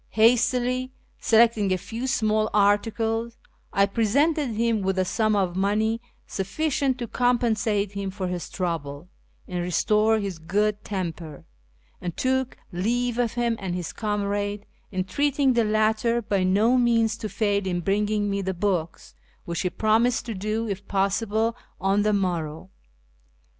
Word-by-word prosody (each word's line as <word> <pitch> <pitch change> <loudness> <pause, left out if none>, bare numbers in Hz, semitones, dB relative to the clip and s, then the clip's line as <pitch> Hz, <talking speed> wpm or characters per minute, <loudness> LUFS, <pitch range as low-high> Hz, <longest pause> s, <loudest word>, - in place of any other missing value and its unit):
Hastily 245 +3 +3 0.3
selecting 225 -3 +4
a 185 - +2
few 230 +7 -5
small 215 -4 +1
articles, 225 +3 +1 0.3
I 200 - +4
presented 280 +9 +1
him 230 -1 +1
with 190 0 -1
a 185 - +2
sum 215 +2 +1
of 185 -3 0
money 215 +4 +1 0.2
sufficient 275 +6 -1
to 240 -1 -4
compensate 225 -5 +1
him 200 -1 -4
for 190 -1 -4
his 180 -3 -4
trouble 165 -3 -4 0.4
and 180 -1 -3
restore 210 +5 +2
his 195 -5 -4
good 210 +5 0
temper, 170 -6 -5 0.6
and 175 -2 -5
took 260 0 0
leave 235 +6 -1
of 240 -2 +1
him 240 -1 0
and 185 -3 -3
his 180 -2 -4
comrade, 205 -1 -2 0.3
entreating 265 +9 +1
the 235 -1 +3
latter 215 +2 +2
by 200 -4 0
no 215 +7 +3
means 230 -3 +2
to 220 -2 -5
fail 205 -3 0
in 175 -1 -1
bringing 205 +2 0
me 200 0 -1
the 190 -1 -3
books, 175 -3 -2 0.3
which 170 0 -3
he 180 - 0
promised 225 +5 +2
to 230 - -4
do, 215 +3 -2
if 200 -1 -5
possible, 215 +3 0 0.2
on 195 +2 +2
the 210 +1 +2
morrow. 180 -3 -2
210 Hz, 145 wpm, -25 LUFS, 190-230 Hz, 0.6 s, selecting